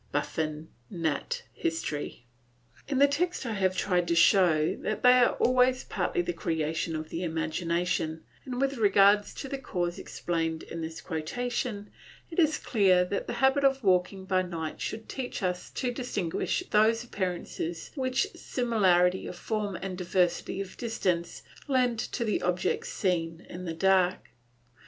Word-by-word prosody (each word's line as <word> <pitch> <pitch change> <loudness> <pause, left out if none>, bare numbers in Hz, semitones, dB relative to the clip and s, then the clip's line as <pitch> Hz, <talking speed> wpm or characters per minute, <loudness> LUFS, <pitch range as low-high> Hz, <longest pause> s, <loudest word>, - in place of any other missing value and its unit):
Buffon, 155 0 -2 0.2
Nat. 170 - -2
Hist. 330 - -2
In 120 - -8
the 280 +1 +7
text 315 +1 -1
I 230 - -2
have 190 -2 +1
tried 180 -2 +1
to 170 - +1
show 170 -3 +4
that 215 - -3
they 250 0 +8
are 245 - +4
always 255 0 +3
partly 355 - -1
the 350 - -2
creation 160 - -2
of 155 0 -5
the 165 - -3
imagination, 165 0 -1 0.2
and 250 -1 -5
with 275 0 0
regard 205 -1 +5
to 270 - -7
the 275 0 -4
cause 175 -8 -2
explained 165 -2 -2
in 165 - -6
this 160 0 -6
quotation, 205 +6 -3 0.4
it 330 - -2
is 310 -2 +4
clear 190 -6 +3
that 200 +2 -3
the - - -3
habit 270 +1 +3
of 270 -1 +3
walking 190 0 +2
by 185 -1 +2
night 165 -4 -5
should 220 0 -4
teach 255 -5 -5
us 180 -1 -2
to 250 -2 -2
distinguish 240 - -2
those 225 +2 +4
appearances 180 -5 -4
which 260 +3 0
similarity 190 -7 +2
of - - -6
form 205 +1 -2
and 190 -1 -4
diversity 180 +1 0
of 195 -1 -6
distance 185 -7 -2 0.2
lend 250 -4 +2
to 235 - -2
the 215 - 0
objects 440 - 0
seen 170 - -1
in 180 +1 -7
the 165 - -3
dark. 185 0 +2
190 Hz, 155 wpm, -28 LUFS, 170-245 Hz, 0.4 s, they